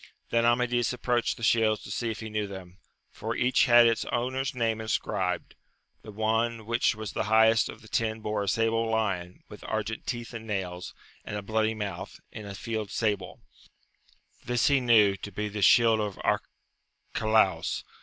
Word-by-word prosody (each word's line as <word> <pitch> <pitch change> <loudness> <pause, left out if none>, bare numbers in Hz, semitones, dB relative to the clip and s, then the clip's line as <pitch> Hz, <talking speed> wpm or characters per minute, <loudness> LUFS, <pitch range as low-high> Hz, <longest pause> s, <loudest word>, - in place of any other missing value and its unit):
Then 115 0 +3
Amadis 120 0 +2
approached 120 -1 0
the 115 - -10
shields 110 -2 +2
to - - -8
see 115 +2 -2
if 110 - -5
he 110 - -6
knew 105 -1 -1
them, 95 -1 -10 0.3
for 110 +2 -4
each 125 0 +3
had 120 0 +7
its 115 -1 +2
owner's 130 +3 -2
name 115 -2 0
inscribed; 95 -5 -2 0.5
the 110 - -10
one 110 +2 0
which 115 0 +1
was 110 -2 -6
the - - -1
highest 110 +1 +4
of 115 - -10
the - - -14
ten 110 0 -1
bore 105 -1 -2
a 100 - -3
sable 115 +2 +1
lion, 95 -5 -2
with 105 - -12
argent 110 0 -3
teeth 120 -1 -4
and 115 -1 -7
nails, 90 -4 -4 0.3
and - - -6
a 100 - -5
bloody 110 +1 0
mouth, 100 -2 -6
in 105 -2 -8
a 100 - -7
field 110 +1 -4
sable: 105 -1 -2 1.0
this 120 +2 +1
he 140 -1 +4
knew 110 -5 +5
to 105 - -8
be 105 +2 -3
the 105 0 -5
shield 115 +2 +5
of 105 -2 -3
Arcalaus. 140 -3 -1
110 Hz, 175 wpm, -28 LUFS, 105-115 Hz, 1.0 s, had